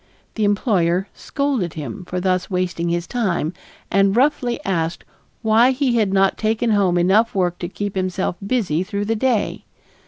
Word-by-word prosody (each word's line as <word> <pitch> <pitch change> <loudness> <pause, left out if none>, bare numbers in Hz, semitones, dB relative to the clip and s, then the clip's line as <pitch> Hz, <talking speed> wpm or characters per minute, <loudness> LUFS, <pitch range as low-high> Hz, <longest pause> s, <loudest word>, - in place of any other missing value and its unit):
The 215 - 0
employer 195 -3 +1
scolded 270 - -2
him 150 +2 -6
for 180 +1 -3
thus 185 0 0
wasting 180 -2 -1
his 170 0 -1
time 180 -9 -1 0.4
and 195 +1 +3
roughly 250 -2 +1
asked 170 -3 -1 0.4
why 225 +3 +5
he 260 -2 +1
had 210 -4 +2
not 195 0 +2
taken 220 +2 +1
home 195 -4 +2
enough 200 +7 +3
work 180 -2 0
to 175 - -4
keep 205 +1 -4
himself 185 -1 -1
busy 195 -7 0
through 200 +2 -3
the 225 +2 0
day. 230 -2 0
195 Hz, 160 wpm, -20 LUFS, 180-225 Hz, 0.4 s, why